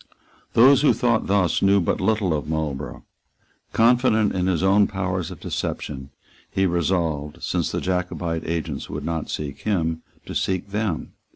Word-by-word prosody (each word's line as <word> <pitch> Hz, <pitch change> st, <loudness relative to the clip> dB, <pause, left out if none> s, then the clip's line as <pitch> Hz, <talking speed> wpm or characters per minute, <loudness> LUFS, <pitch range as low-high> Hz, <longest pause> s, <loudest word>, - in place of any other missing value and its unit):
Those 130 Hz, +3 st, +7 dB
who 150 Hz, -, +5 dB
thought 120 Hz, -2 st, +1 dB
thus 95 Hz, -3 st, +2 dB
knew 100 Hz, 0 st, +5 dB
but 85 Hz, -, 0 dB
little 105 Hz, -6 st, +1 dB
of 75 Hz, 0 st, -4 dB
Marlborough. 75 Hz, -4 st, -3 dB, 0.7 s
Confident 115 Hz, -2 st, +3 dB
in 90 Hz, 0 st, 0 dB
his 90 Hz, -2 st, +1 dB
own 100 Hz, +1 st, +5 dB
powers 95 Hz, -3 st, -2 dB
of -, -, -9 dB
deception, 65 Hz, -2 st, -4 dB, 0.4 s
he 95 Hz, -, +1 dB
resolved, 85 Hz, -4 st, -1 dB
since -, -, -1 dB
the -, -, -2 dB
Jacobite 90 Hz, -2 st, -2 dB
agents 85 Hz, 0 st, -3 dB
would -, -, -5 dB
not 80 Hz, -2 st, -3 dB
seek 70 Hz, -2 st, -4 dB
him, 80 Hz, -6 st, -1 dB, 0.2 s
to -, -, -7 dB
seek 95 Hz, +1 st, -1 dB
them. 105 Hz, -6 st, -2 dB
90 Hz, 155 wpm, -23 LUFS, 80-100 Hz, 0.7 s, Those